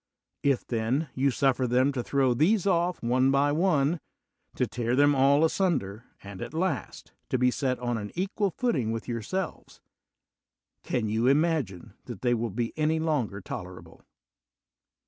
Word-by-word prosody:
If, 140 -3 +1
then, 125 +6 -1
you 135 +2 +2
suf 135 0 +2
fer 130 - 0
them 130 +3 +3
to 130 -3 -2
liirow 130 -1 +1
these 185 - +3
oflf 175 -4 0
one 130 +3 +3
by 140 +1 +3
one, 160 -1 +2 0.6
to - - +1
tear 120 0 -2
them 145 +1 +5
all 140 +3 +4
asunder, 125 - -1 0.2
and, 100 -1 -9
at - - -6
last, 165 -6 -3 0.2
to - - +1
be 125 0 +3
set 130 -1 -1
on 120 -2 -2
an 105 -1 -6
equal 195 +3 -1
footing 155 - -1
with 115 0 -4
yourselves, 130 - -4 1.0
can 115 -3 -2
you 110 +3 +1
imagine 140 - +1
that 120 -4 -9
they 120 -1 +3
will 115 0 -1
be 115 +3 -3
any 155 +1 +1
longer 140 -11 -1
tolerable? 90 0 -9
130 Hz, 160 wpm, -27 LUFS, 120-160 Hz, 1.0 s, them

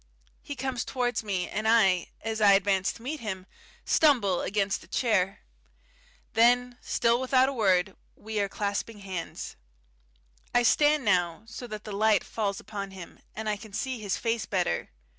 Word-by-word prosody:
He 285 - -6
comes 260 -2 -2
towards 245 -3 -1
me, 190 -4 -2
and 215 +1 -2
I, 195 -6 +4
as 220 0 -3
I 200 -1 +7
advance 195 -1 +2
to 230 - -14
meet 295 +4 -4
him, 190 -5 -5 0.4
stumble 230 - +3
against 200 0 -1
a - - -16
chair. 195 -6 +1 0.9
Then, 245 +1 +3
still 235 +1 +1
without 260 0 +4
a - - -4
word, 195 -5 +2 0.2
we 215 0 -4
are 200 -1 0
clasping 205 +2 -3
hands. 190 -4 -6 1.0
I 245 - +5
stand 295 +2 +4
now 180 -2 +1
so 235 +2 -8
that 215 -2 -7
the 215 - -7
light 210 0 +3
falls 200 -3 -2
upon 200 -2 -6
him, 190 -3 -11 0.2
and 220 0 -5
I 210 -1 0
can 215 -1 -13
see 260 +3 -3
his 205 -3 -2
face 230 -2 -1
better. 85 - -1
215 Hz, 165 wpm, -28 LUFS, 195-240 Hz, 1.0 s, I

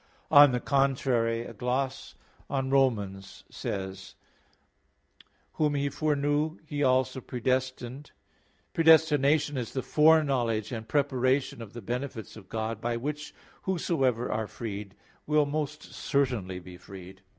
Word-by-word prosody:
On 145 -1 +9
the 125 - 0
contrary, 125 -4 +1
A - - -8
gloss 130 +2 -2 0.3
on 135 -1 -1
Rom. 135 -3 +4
8:29: 95 -1 -7 1.4
"Whom 150 -2 +1
He 140 0 0
foreknew, 150 +1 0
He 145 -2 -4
also 130 -1 +2
predestinated", 130 +2 -2
says: - - -25 0.6
"Predestination 150 -3 +4
is 120 -3 -4
the 130 - -2
foreknowledge 135 -9 +3
and 110 -2 -5
preparation 130 -3 +1
of 110 -2 -9
the 120 - -8
benefits 125 -1 -5
of 100 -4 -13
God, 110 0 -3
by 120 0 -1
which 150 +4 -5 0.3
whosoever 135 -10 0
are 110 0 -1
freed 105 -2 -6 0.3
will 150 0 +3
most 150 +1 -4
certainly 125 -9 -1
be 90 0 -12
freed." 95 0 -12
130 Hz, 125 wpm, -28 LUFS, 115-145 Hz, 1.4 s, On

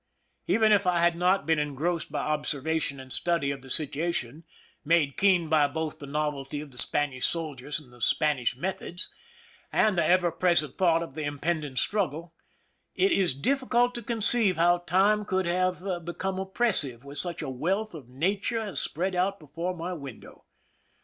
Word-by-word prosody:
Even 220 -1 +3
if 200 -2 +3
I 180 -1 +3
had 170 0 +3
not 180 -1 +2
been 160 0 +2
engrossed 150 +4 -2
by - - -2
observation 150 -1 -1
and 130 -1 -8
study 170 -5 +2
of 140 -1 -6
the 135 - -12
situation, 155 0 -1 0.4
made 150 -3 +2
keen 185 -4 +3
by 155 -2 +4
both 160 +2 -4
the 140 - -9
novelty 145 -1 -3
of 150 -1 -9
the 125 - 0
Spanish 140 -4 +1
soldiers 150 -3 -4
and 120 -5 -17
Spanish 130 -3 +1
meth 190 +6 -3
ods, 175 +2 -4 0.6
and 215 -3 +3
the 170 - +2
ever 175 +1 +3
present 170 -3 +1
thought 170 -3 +3
of 165 - -9
the 155 +1 -5
impending 145 0 -2
struggle, 170 0 -1 0.6
it 385 +1 +3
is 185 - +2
difficult 245 - +1
to 240 - -4
conceive 225 -3 +3
how 175 +1 +4
time 195 +4 +2
could 190 -2 -1
have 180 +1 0 0.2
become 185 +3 -3
oppressive 190 - 0
with 140 +1 -4
such 175 -3 0
awealth 180 - -2
of 140 -7 -10
nature 195 - -1
as 215 -3 -1
spread 185 +4 -1
out 190 +2 0
before 170 +4 -5
my 175 +2 -4
window. 140 -8 -10
170 Hz, 170 wpm, -27 LUFS, 145-185 Hz, 0.6 s, by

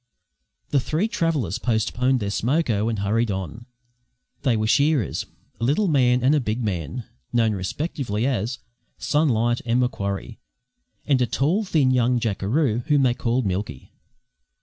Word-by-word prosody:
The 140 - +3
three 155 - 0
travellers 155 - -1
postponed 125 +3 +1
their 100 -1 -2
smoke 135 +9 0
ho 105 0 +1
and 115 - -2
hurried 110 +4 0
on. 95 +4 -5 0.7
They 130 -5 +2
were 110 - 0
shearers 135 - +1 0.3
a - - -4
little 150 - +2
man 125 -5 +3
and 135 +3 +4
a 150 - +3
big 115 -1 -2
man, 100 - -3 0.3
known 115 -2 +2
respectively 110 - -3
as 120 -2 -1 0.4
"Sunlight" 120 -6 +1
and 120 +1 +1
"Macquarie," 100 -6 -2 0.7
and 135 -4 +2
a 125 - +2
tall, 155 - +1
thin, 150 -8 +2
young 125 0 +2
jackeroo 115 - 0
whom 145 -2 +3
they 125 -2 +3
called 120 0 -1
"Milky." 95 -8 -4
120 Hz, 150 wpm, -23 LUFS, 110-140 Hz, 0.7 s, and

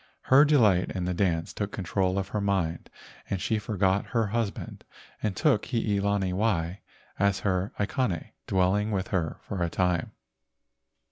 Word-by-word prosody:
Her 135 +3 +6
delight 110 -12 +4
in 90 -2 -2
the 90 - -1
dance 85 -3 0
took 105 -1 -3
control 95 0 -1
of 95 0 -2
her 105 - -2
mind, 95 -5 -1 0.4
and 100 - -1
she 110 +4 0
forgot 100 -2 +1
her 115 -1 +3
husband 110 0 -3 0.4
and 105 -3 -1
took 105 - +2
Hii 110 -5 0
lani 100 -2 0
wai 95 -3 0 0.4
as 100 0 +2
her 95 0 0
aikane, 105 - -1 0.2
dwelling 95 +3 +2
with 95 -3 -2
her 85 -5 -1
for 95 - -5
a 85 - +1
time. 90 -1 0
100 Hz, 155 wpm, -27 LUFS, 90-105 Hz, 0.4 s, Her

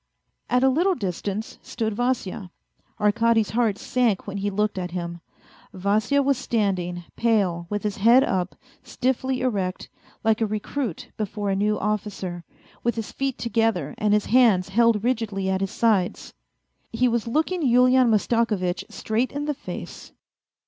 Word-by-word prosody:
At 250 +1 +2
a 265 - +6
little 350 +8 +2
distance 200 - -4
stood 220 -1 -3
Vasya. 220 -5 -2 0.5
Arkady's 225 +1 +2
heart 220 -2 +1
sank 235 -5 0
when 200 0 -5
he 200 +1 -1
looked 210 0 -1
at 180 -1 -3
him. 170 -1 -5 0.5
Vasya 215 +9 +1
was 275 -2 +1
standing, 185 -8 -1
pale, 195 -7 +1
with 205 0 -3
his 210 -2 -2
head 235 +6 +6
up, 185 -5 -1 0.3
stiffly 260 0 -1
erect, 195 -7 -2 0.3
like 220 0 +2
a 220 - +2
recruit 215 - -4
before 205 -1 -2
a - - +1
new 210 +2 +1
officer, 200 -4 -3 0.4
with 235 - +1
his 225 -2 -5
feet 270 -2 -2
together 225 - 0
and 210 0 +3
his 210 - +1
hands 220 -7 +4
held 225 0 +3
rigidly 215 -6 -1
at 190 0 -1
his 195 - -1
sides. 205 -6 0 0.6
He 245 +2 +2
was 235 -1 0
looking 320 +8 0
Yulian 255 -1 +5
Mastakovitch 210 -4 +1
straight 225 +4 -1
in 290 +1 -3
the 295 - 0
face. - - -8
215 Hz, 150 wpm, -24 LUFS, 195-245 Hz, 0.6 s, a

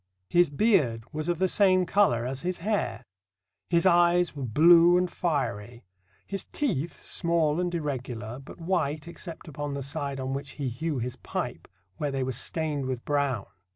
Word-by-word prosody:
His 175 -2 +5
beard 145 - +2
was 155 +2 -3
of 175 - +1
the 190 +2 +2
same 185 -1 +4
colour 165 - +2
as 130 +1 -3
his 180 0 -2
hair. 170 - -2 0.6
His 170 0 +2
eyes 175 -2 +4
were 140 - -6
blue 165 +8 +6
and 180 0 +2
fiery. 120 - -2 0.4
His 195 -1 -4
teeth, 175 - -3
small 170 -3 +1
and 180 -1 0
irregular, 125 -6 -4
but 135 - -12
white 165 -3 -1
except 170 0 -9
upon 145 -1 -4
the 140 - -4
side 140 -1 -3
on 130 0 -3
which 140 +1 -5
he 140 -3 -2
hew 150 +5 -3
his 125 +1 -4
pipe, - - -5 0.3
where 145 - -1
they 135 -1 -1
were 130 - -1
stained 145 +2 -2
with 130 -2 -4
brown. 140 -7 0
150 Hz, 170 wpm, -27 LUFS, 130-175 Hz, 0.6 s, blue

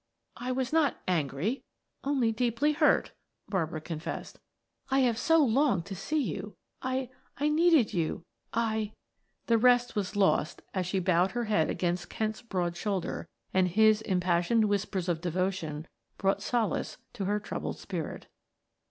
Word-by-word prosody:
"I 250 +1 -3
was 260 +2 -1
not 320 -3 +3
angry, 170 - 0 0.4
only 270 -5 +2
deeply 240 +5 +1
hurt," 300 - +3 0.4
Barbara 160 -5 -1
confessed. 160 +1 -6 0.5
"I 270 0 +3
have 245 -3 +3
so 325 +6 +4
longed 240 - +2
to 200 - -6
see 305 - -1
you. 190 - -5 0.3
I 260 -1 -2 0.3
I 295 +3 +1
needed 315 -5 +4
you! 165 -1 -1 0.3
I 220 -2 -1 0.3
" - - -47
The 230 -1 +3
rest 245 0 +4
was 205 -1 -2
lost 190 -5 +2
as 185 -2 -1
she 190 - -1
bowed 185 0 +2
her 240 - -1
head 210 -8 +2
against 175 0 -1
Kent's 220 0 -2
broad 180 -7 -2
shoulder, 190 -2 -2 0.3
and 185 -1 +4
his 215 +3 +4
impassioned 185 +2 +2
whispers 200 -3 -1
of 170 -2 0
devotion 175 -3 -2 0.3
brought 195 0 +1
solace 235 -4 -1 0.2
to 195 - -3
her 205 +2 +1
troubled 210 - -4
spirit. 170 -6 -5
205 Hz, 150 wpm, -29 LUFS, 180-240 Hz, 0.5 s, so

